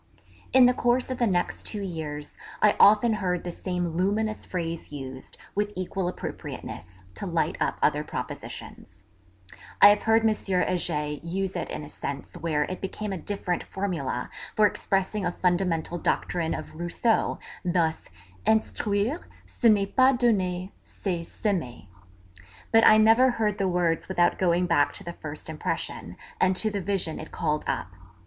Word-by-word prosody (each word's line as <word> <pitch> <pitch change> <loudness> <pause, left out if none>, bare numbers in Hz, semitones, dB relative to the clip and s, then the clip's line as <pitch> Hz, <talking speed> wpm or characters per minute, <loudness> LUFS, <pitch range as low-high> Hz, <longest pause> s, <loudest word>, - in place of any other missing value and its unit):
In 260 -1 +7
the 250 - +5
course 245 +1 +1
of 255 - -4
the 240 - +3
next 180 -3 -1
two 210 -2 -3
years 155 -5 -5 0.2
I 210 - +4
often 215 +3 +6
heard 180 -2 0
the 175 - -4
same 180 0 -2
luminous 205 +6 -1
phrase 170 -3 -4
used, 130 -2 -8 0.2
with 205 +1 0
equal 185 0 -2
appropriateness, 95 - -7
to - - -4
light - - 0
up - - 0
other - - +3
propositions. - - -7 0.8
(I 205 - +10
have 205 0 +4
heard 225 0 +3
M. 220 - +4
Heger 180 -6 0 0.2
use 190 +3 -2
it 175 - -3
in - - -5
a 150 - -9
sense 140 -2 -6
where 155 -3 0
it 185 +5 -5
became 200 +1 -4
a - - -3
different 185 -2 -2
formula 165 -11 -3 0.2
for 215 - +5
expressing 195 0 0
a - - 0
fundamental 175 -2 0
doctrine 165 -1 0
of 155 -1 -7
Rousseau, 175 +6 +1 0.3
thus, 170 -3 0 0.3
'Instruire, 220 - +1 0.3
ce - - -5
n'est 200 -2 +2
pas 260 0 +6
donner, 190 -6 +1
c'est 180 -4 -3
semer,' 155 - -3 0.8
but 225 0 +6
I 215 - +8
never 225 +4 +6
heard 210 -2 0
the 195 - +2
words 175 -2 +1
without 175 -2 +2
going 180 -1 +2
back 145 -4 +2
to 200 - -6
the 170 -2 -6
first 155 -2 -8
impression, 155 -1 -4 0.2
and 185 0 +3
to 215 +3 +1
the 200 -1 -2
vision 185 -4 -1
it 155 - -8
called 150 0 -1
up. - - -2
185 Hz, 160 wpm, -26 LUFS, 165-210 Hz, 0.8 s, I